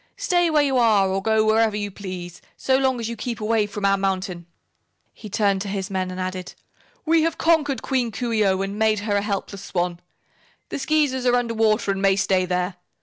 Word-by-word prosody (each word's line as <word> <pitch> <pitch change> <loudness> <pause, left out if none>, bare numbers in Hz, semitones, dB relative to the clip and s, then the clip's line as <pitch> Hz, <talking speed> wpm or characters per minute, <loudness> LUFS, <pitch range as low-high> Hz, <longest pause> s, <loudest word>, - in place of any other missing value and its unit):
Stay 355 -9 +2
where 305 -2 +3
you 270 -3 +1
are, 215 -5 +4
or 190 +1 -1
go 220 +1 +2
wherever 220 -1 +2
you 205 -1 -3
please, 185 -3 -8 0.2
so 260 - +1
long 265 -2 +1
as 230 - -3
you 235 - -4
keep 235 0 -5
away 215 -1 +1
from 205 0 -4
our 195 0 +3
mountain." 185 -3 -2 0.7
He 215 - -11
turned 200 -1 +1
to 200 - -4
his 195 0 -4
men 185 -1 -1
and 185 0 -6
added: 185 0 -5 0.5
"We 325 0 +4
have 330 0 0
conquered 300 -5 +1
Queen 250 -4 0
Coo 240 +3 -3
ee 215 -1 +3
oh 190 -1 +2
and 200 +2 -5
made 215 -1 +2
her 205 -1 0
a - - +1
helpless 200 -1 -4
swan. 175 -2 -2 0.7
The - - -4
Skeezers 270 -3 +1
are 245 - +4
under 240 -2 0
water 215 -2 +2
and 195 0 -3
may 195 -1 +4
stay 190 -1 +1
there. 180 0 -2
210 Hz, 215 wpm, -23 LUFS, 195-245 Hz, 0.7 s, are